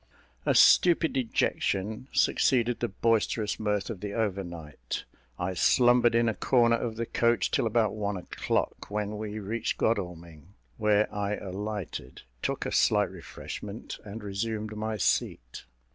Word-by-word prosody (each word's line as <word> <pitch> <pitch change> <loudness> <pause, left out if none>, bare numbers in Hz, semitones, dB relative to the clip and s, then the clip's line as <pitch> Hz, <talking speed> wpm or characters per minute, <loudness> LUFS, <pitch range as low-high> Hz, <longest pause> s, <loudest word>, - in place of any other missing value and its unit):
A - - +3
stupid 170 -2 +6
dejection 110 -2 -1
succeeded 120 -2 +2
the 120 - 0
boisterous 110 0 0
mirth 105 -1 -1
of 105 - -7
the 105 0 -5
overnight. 85 - -4 0.3
I 90 +1 -2
slumbered 120 +4 +4
in 115 0 +3
a 110 - +2
corner 120 0 +3
of 115 -1 -3
the 115 +1 -2
coach 115 -3 +1
till - - +1
about 110 -1 +2
one 105 -2 -2
o'clock, 90 - -2
when 105 0 -3
we 105 0 -5
reached 110 +2 -2
Godalming, 90 -4 -3 0.2
where 105 -1 +3
I 105 0 -1
alighted, 100 - -6 0.2
took - - -2
a - - -2
slight - - +3
refreshment, - - -8
and 105 +1 -8
resumed 105 +2 -3
my 110 0 -3
seat. 65 -9 -1
105 Hz, 140 wpm, -28 LUFS, 100-115 Hz, 0.3 s, stupid